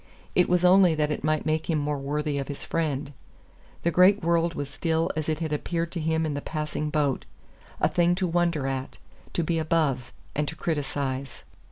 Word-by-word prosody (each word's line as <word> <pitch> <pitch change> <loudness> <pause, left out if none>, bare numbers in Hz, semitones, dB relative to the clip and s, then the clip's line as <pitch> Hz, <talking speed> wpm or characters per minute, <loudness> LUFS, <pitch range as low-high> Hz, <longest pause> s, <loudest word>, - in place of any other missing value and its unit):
It 180 - +3
was 180 0 +3
only 180 -2 +6
that 150 -1 +1
it 150 - -3
might 155 0 +1
make 155 +1 0
him 160 - +2
more 145 -1 -1
worthy 145 +1 -1
of 135 - -4
his 145 - -5
friend. 145 -3 -2 0.7
The 170 - +2
great 185 +3 +5
world 170 0 +2
was 145 - -3
still 160 +3 0
as 155 0 -2
it 155 +1 -1
had 160 -2 -1
appeared 165 +2 -2
to 175 - -3
him 160 0 +1
in 155 - -1
the 145 - -3
passing 150 0 -3
boat 145 -3 0 0.6
a - - +4
thing 175 0 +2
to 185 +1 0
wonder 170 -4 +1
at 135 0 -3 0.4
to 170 - +1
be 165 0 0
above 155 -6 0 0.2
and 150 0 -1
to 160 - -4
criticize. 140 -4 -3
155 Hz, 200 wpm, -26 LUFS, 145-170 Hz, 0.7 s, only